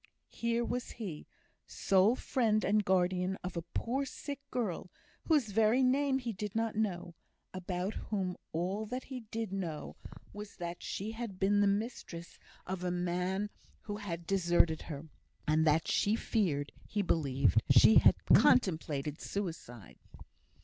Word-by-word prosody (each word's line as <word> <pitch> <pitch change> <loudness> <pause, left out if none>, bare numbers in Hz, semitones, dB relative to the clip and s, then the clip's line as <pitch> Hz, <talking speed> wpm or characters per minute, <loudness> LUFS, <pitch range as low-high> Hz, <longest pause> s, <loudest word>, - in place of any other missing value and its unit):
Here 235 0 -1
was 245 +1 -3
he, 190 -10 -7 0.4
sole 195 +5 +3
friend 220 -5 +1
and 210 +2 +3
guardian 185 0 +1
of 180 0 -5
a 170 - -1
poor 235 +10 -2
sick 280 +1 -6
girl, 210 -7 -3 0.4
whose 290 -10 +3
very 225 +5 +4
name 270 +1 +3
he 240 -3 -4
did 205 +1 -5
not 225 -1 0
know; 180 -5 -2 0.4
about 185 +2 -3 0.2
whom 190 -4 -1 0.2
all 190 +6 -2
that 250 +4 -4
he 260 -2 -6
did 225 -3 -3
know 170 -6 -4 0.4
was, 205 0 -8
that 175 -1 -6
she 205 +3 -4
had 225 -4 -6
been 200 +2 +3
the 205 - +4
mistress 200 -5 -3 0.3
of 185 -1 -4
a 180 - 0
man 180 +3 -1 0.3
who 205 -2 -5
had 175 -5 -5
deserted 170 -3 +2
her, 150 0 -6 0.4
and 155 +1 +3
that 155 +2 +3
he 205 +2 +2
feared 165 -12 0 0.2
he 205 -1 -1
believed 135 - +2
she 135 - +8
had - - +7 0.2
contemplated 155 - +3
suicide. 165 - -6
195 Hz, 145 wpm, -32 LUFS, 170-220 Hz, 0.4 s, she